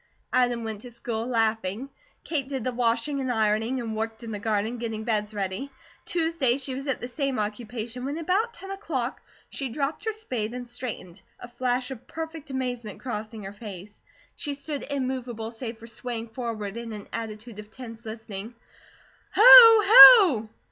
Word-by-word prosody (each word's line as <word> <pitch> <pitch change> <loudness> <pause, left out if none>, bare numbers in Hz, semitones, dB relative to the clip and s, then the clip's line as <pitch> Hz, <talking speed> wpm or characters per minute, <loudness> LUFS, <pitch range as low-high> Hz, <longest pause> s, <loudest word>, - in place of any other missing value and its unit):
Adam 245 -2 +1
went 220 -2 -6
to 245 - -10
school, 230 -1 -5
laughing. 225 -1 -1 0.4
Kate 285 -5 -2
did 265 -4 -4
the 255 - -1
washing 245 +4 0
and 260 -1 -2
ironing, 220 +2 0
and 225 -2 -4
worked 225 +1 -4
in 230 - -7
the 210 - -5
garden 220 +2 -2
getting 225 -2 -4
beds 215 -2 -1
ready. 200 +5 -4 0.4
Tuesday 325 -7 0
she 270 -1 -5
was 270 +2 -6
at 270 - -1
the 245 - -6
same 275 0 -3
occupation, 225 +3 -5
when 280 +3 -3
about 375 +8 0
ten 385 +3 -9
o'clock 300 - -4 0.3
she 270 -2 -4
dropped 280 - -3
her 445 - 0
spade 250 - -5
and 250 -1 -7
straightened, 235 -7 -7 0.2
a - - -9
flash 250 +1 -2
of 255 -3 -9
perfect 320 -2 -7
amazement 245 -5 -4
crossing 220 -3 -6
her 195 +1 -8
face. 205 -1 -10 0.3
She 290 -2 -5
stood 285 0 -6
immovable 255 -5 -4
save 230 -1 -7
for 225 - -13
swaying 230 0 -6
forward 225 -3 -5
in 235 -1 -6
an 210 -1 -9
attitude 220 -1 -7
of 210 0 -10
tense 230 -1 -11
listening. 220 0 -8 0.8
"Hoo! 455 -1 +10 0.4
hoo!" 230 - -1
240 Hz, 170 wpm, -26 LUFS, 220-265 Hz, 0.8 s, Hoo